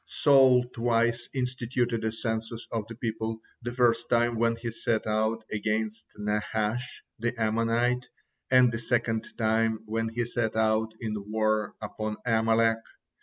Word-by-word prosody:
Saul 135 -3 +5
twice 115 0 +1
instituted 125 -2 -1
a 110 - 0
census 110 0 -4
of 110 -3 -2
the 115 - -7
people, 110 -1 -3 0.2
the 120 0 -4
first 120 -1 +2
time 120 0 +3
when 115 0 +2
he 115 0 -5
set 115 0 -1
out 110 +1 0
against 110 +1 -2
Nahash, 105 +3 -2 0.2
the 120 +1 -2
Ammonite, 115 +3 +1 0.4
and 125 -1 +6
the 115 - -3
second 115 -2 0
time 110 -1 +1
when 115 +1 -1
he 120 +1 -2
set 115 -2 -1
out 110 0 +2
in 110 -2 -2 0.2
war 110 -1 0
upon 110 0 -4
Amalek. 115 -1 +3
115 Hz, 140 wpm, -28 LUFS, 110-120 Hz, 0.4 s, and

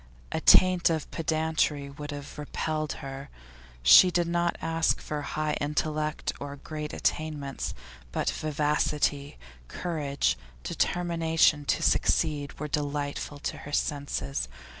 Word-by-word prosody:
A - - -2
taint 185 -2 +6
of 160 -3 -2
pedantry 155 -3 0
would 145 +1 -8
have 145 0 -7
repelled 155 +1 -2
her. 135 +1 -7 0.5
She 180 - +9
did 175 -1 +1
not 170 0 0
ask 165 0 +1
for 150 -1 -4
high 155 +1 -2
intellect 150 +1 -1
or 140 0 -6
great 150 +1 -6
attainments; 150 -3 -2 0.4
but - - 0
vivacity, 150 -1 0 0.3
courage, 140 - -1 0.2
determination 165 -4 +2
to - - +1
succeed, 150 -3 +1
were 150 - -3
delightful 145 0 -2
to - - -3
her 145 - -9
senses. 75 - -1
150 Hz, 120 wpm, -28 LUFS, 145-160 Hz, 0.5 s, She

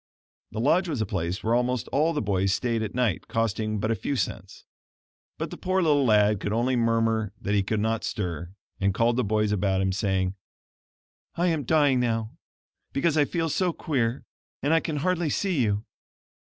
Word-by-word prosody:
(The 110 - -5
lodge 165 +10 +3
was 145 -7 -2
a 110 - +1
place 90 -1 -3
where 115 - +1
almost 125 0 0
all 155 +4 +2
the 150 -6 -1
boys 95 -1 +1
stayed 115 -2 -1
at 110 0 -4
night, 120 -8 0
costing 110 -1 -1
but 110 +2 0
a - - +2
few 140 +7 -3
cents.) - - -4 0.7
But - - -4
the - - -7
poor 185 +1 0
little 145 -3 +3
lad 105 -2 +4
could 105 - -3
only 120 +4 +1
murmur 115 -3 +1
that 100 - -2
he 100 - +3
could 105 +2 -1
not 110 +1 0
stir, 90 -2 -4 0.2
and 95 -1 +1
called 115 +1 +2
the 125 - +1
boys 105 0 +1
about 95 -2 +1
him, 95 0 +1
saying: 95 -1 0 1.0
"I 175 +1 +2
am 155 -5 -1
dying 145 -3 +3
now, 115 -2 -1 0.6
because 150 +3 +1
I 150 -2 +4
feel 165 +2 -1
so 175 +3 0
queer: 125 -6 -1 0.4
and 145 +3 +2
I 165 - +5
can 160 -1 -3
hardly 175 +1 0
see 180 -1 0
you. 105 -1 0
115 Hz, 190 wpm, -26 LUFS, 105-145 Hz, 1.0 s, I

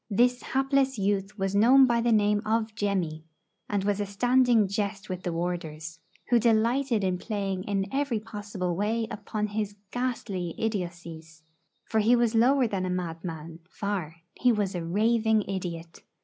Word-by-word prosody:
This 245 +4 +2
hapless 270 0 +1
youth 200 +1 -1
was 195 -1 -1
known 255 +6 +7
by 235 -2 +2
the 235 0 +2
name 210 -1 +3
of 220 0 0
'Jemmy,' 185 -7 -2 0.5
and 205 -2 0
was 205 0 0
a - - -1
standing 245 +1 +3
jest 200 +1 -3
with 185 -1 -4
the 175 - -3
warders, 165 -2 -4 0.3
who 240 - +6
delighted 230 +1 +2
in 185 -1 0
playing 195 -4 -3
in 195 -1 0
every 275 -5 0
possible 205 -4 -4
way 220 +4 0
upon 210 0 -3
his 210 -1 -3 0.2
ghastly 210 -9 -3
idiotcies. 170 -6 -5 0.4
For 220 - 0
he 225 +3 +4
was 235 -1 +2
lower 250 +4 +4
than 195 -3 -2
a 185 - -2
madman, 165 -2 -5
far; 190 -6 -3 0.2
he 250 - +3
was 205 -4 0
a 175 -2 -3
raving 220 +4 +2
idiot. 170 -4 -6
205 Hz, 160 wpm, -27 LUFS, 180-230 Hz, 0.5 s, known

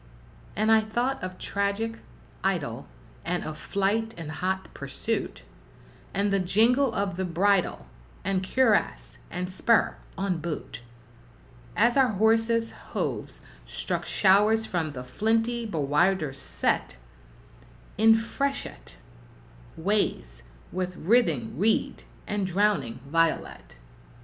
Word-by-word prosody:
And 215 +1 +2
I 220 - +7
thought 240 +5 -1
of 185 0 -5
tragic 200 +3 -2 0.4
idyl, - - -1 0.4
and 175 +1 -2
of 155 - -5
flight 205 +6 -1
and 160 -2 -6
hot 185 +4 -3
pursuit, - - -4 0.7
And 200 +1 0
the 195 - +3
jingle 230 +8 +3
of 195 -3 -1
the 190 - -1
bridle, 185 +2 +1 0.4
and 195 0 0
cuirass, 185 - +1
and 180 +1 -3
spur 230 +5 +2 0.2
on 190 -3 -1
boot, 155 -7 -5 1.0
As 240 - +4
our 255 -4 +4
horses's 225 +2 +2 0.2
hooves - - -3 0.3
struck - - -1
showers 210 +3 +4
from 165 -7 -2
the 125 -2 -6
flinty 225 - 0
bowlders 155 -2 +1
set - - -1 1.0
In 225 +2 +6
freshet 275 +5 -3 0.8
ways 160 - -1 0.3
with 180 0 -3
writhing 165 - +1
reed 220 +3 +1 0.2
and 205 -2 -1
drowning 185 - +1
violet. 165 - -1
195 Hz, 110 wpm, -27 LUFS, 170-225 Hz, 1.0 s, I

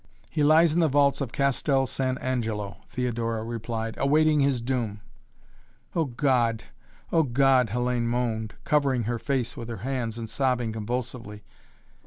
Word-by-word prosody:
"He 150 0 0
lies 155 +2 +5
in 170 - +2
the 165 - +4
vaults 140 0 +3
of 130 -4 -3
Castel 140 0 +1
San 130 0 -1
Angelo," 110 -7 -3
Theodora 115 -3 -2
replied, 115 -1 -4
"awaiting 150 +2 +3
his 140 -3 +2
doom." 115 -4 -2 0.9
"Oh, 165 -2 +2
God! 120 -4 +1 0.5
Oh, 165 - +4
God!" 135 -2 +3
Hellayne 120 +1 0
moaned, 115 -2 -2
covering 140 -5 +2
her 120 +2 -2
face 130 -1 -1
with 115 0 -7
her 115 - -4
hands 125 -4 -2
and 115 -1 -5
sobbing 125 -2 0
convulsively. 110 -1 -5
125 Hz, 145 wpm, -26 LUFS, 115-140 Hz, 0.9 s, lies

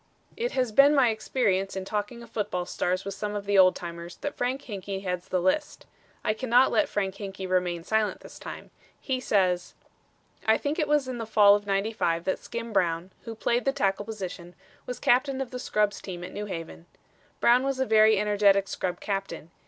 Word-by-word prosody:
It 480 +1 -2
has 255 -3 0
been 280 +6 +6
my 265 -4 +5
experience 215 -4 0
in 190 0 -4
talking 210 +4 -4
of 230 - -15
football 200 -5 -2
stars 185 +1 -2
with 200 - -4
some 210 +1 -4
of 205 -1 -4
the 200 -1 +3
old 185 -1 +6
timers 170 0 -7
that 290 - -4
Frank 255 +3 -2
Hinkey 195 -3 -5
heads 180 -1 -3
the 185 - 0
list. 185 - -1 0.4
I 215 - +1
cannot 250 +2 +3
let 305 - +2
Frank 195 -2 -1
Hinkey 195 -2 -6
remain 180 -2 0
silent 220 +2 0
this - - -12
time. - - -9 0.3
He 260 -2 -2
says: 185 -6 +1 0.7
"I 220 0 +5
think 295 +4 -2
it 305 - +1
was 295 -2 +2
in 250 -2 -4
the 225 - -4
Fall 210 -2 +6
of 205 0 0
'95 195 -4 0
that 190 - -1
Skim 235 -1 -6
Brown, 175 -1 0
who 230 -1 -6
played 235 +2 0
the 270 - +2
tackle 205 -7 0
position, 185 -5 -7 0.3
was 250 - -4
captain 260 +2 +2
of 265 -2 -4
the 250 - -5
scrubs 210 -4 0
team 175 -2 -7
at - - -8
New 210 0 -5
Haven. 165 - -7 0.5
Brown 240 +1 +5
was 270 0 -2
a 265 - +2
very 220 -1 +5
energetic 200 -1 +3
scrub 180 -2 -3
captain. 195 -5 -4
205 Hz, 200 wpm, -27 LUFS, 190-240 Hz, 0.7 s, been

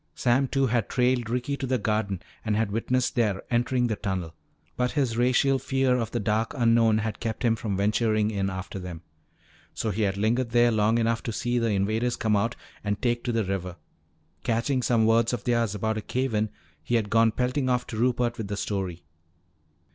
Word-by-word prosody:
Sam 130 +2 +2
Two 135 +1 +1
had 120 -3 0
trailed 125 -2 +1
Ricky 125 +4 -1
to 135 - -3
the 130 0 +1
garden 105 -4 -1 0.2
and 110 -2 0
had 110 -1 0
witnessed 125 +4 0
their 105 -6 0
entering 125 +1 +1
the 110 -3 0
tunnel. 95 -6 -3 0.4
But 125 0 0
his 130 -6 0
racial 130 +3 +3
fear 135 -1 +1
of 115 -3 -1
the - - -2
dark 110 +4 0
unknown 115 -3 +4
had 110 -1 -3
kept 115 +1 -3
him 115 -1 +3
from 105 -3 -3
venturing 110 +1 +1
in 100 -2 -1
after 95 +1 -6
them. 90 -2 -7 0.7
So 110 - -1
he 105 +3 -2
had 100 -2 0
lingered 115 +4 +1
there 120 0 +4
long 110 +1 +2
enough 115 0 +1
to 115 - -4
see 120 +2 -1
the 115 - +1
invaders 110 +4 0
come 110 -1 +1
out 115 +4 0 0.3
and 100 0 -1
take 120 -1 0
to 120 - 0
the 115 -1 +1
river. 90 -2 -3 0.7
Catching 120 +3 0
some 115 -2 +2
words 115 +1 +3
of 125 - -3
theirs 115 -4 +1
about 110 +1 -1
a - - -5
cave 130 +3 -2
in, 105 0 +1 0.3
he 120 - -1
had 110 -3 0
gone 115 0 +4
pelting 125 +3 0
off 125 0 +1
to 115 - -6
Rupert 120 0 +1
with 110 - -3
the 105 0 -4
story. 95 -4 -3
115 Hz, 205 wpm, -26 LUFS, 105-125 Hz, 0.7 s, unknown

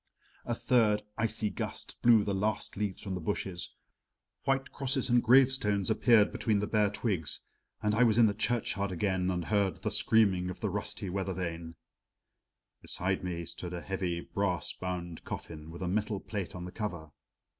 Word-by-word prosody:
A 120 - 0
third 110 -5 +3
icy 110 -1 0
gust - - -4
blew 115 -3 +6
the 100 - -1
last 105 +3 -1
leaves 100 -2 -3
from 100 -3 -4
the 90 - -3
bushes, 95 0 -3 0.7
white 135 0 +1
crosses 135 -1 -1
and 120 0 +5
gravestones 120 -5 +4
appeared 110 -1 +5
between 110 -3 +1
the 105 - 0
bare 105 -1 +2
twigs 100 - -2 0.4
and 105 0 +2
I 110 - +2
was 115 -3 +5
in 120 - +7
the 105 - +3
churchyard 110 -2 0
again 95 0 0
and 90 -2 -1
heard 100 -3 0
the - - 0
screaming 95 -5 +3
of 90 - -6
the 105 -4 -1
rusty 105 0 -3
weather 95 0 -2
vane. 85 -2 -4 1.1
Beside 95 +1 -1
me 85 -2 -3
stood 85 +1 -7
a 85 - -5
heavy 90 -3 -2
brass 95 -4 -1
bound 90 -2 -5
coffin 80 -1 -7
with 85 +3 -7
a - - -1
metal 105 +2 0
plate 100 -4 -5
on 90 -1 -6
the 90 - -7
cover. 85 -9 -5
100 Hz, 175 wpm, -31 LUFS, 90-110 Hz, 1.1 s, in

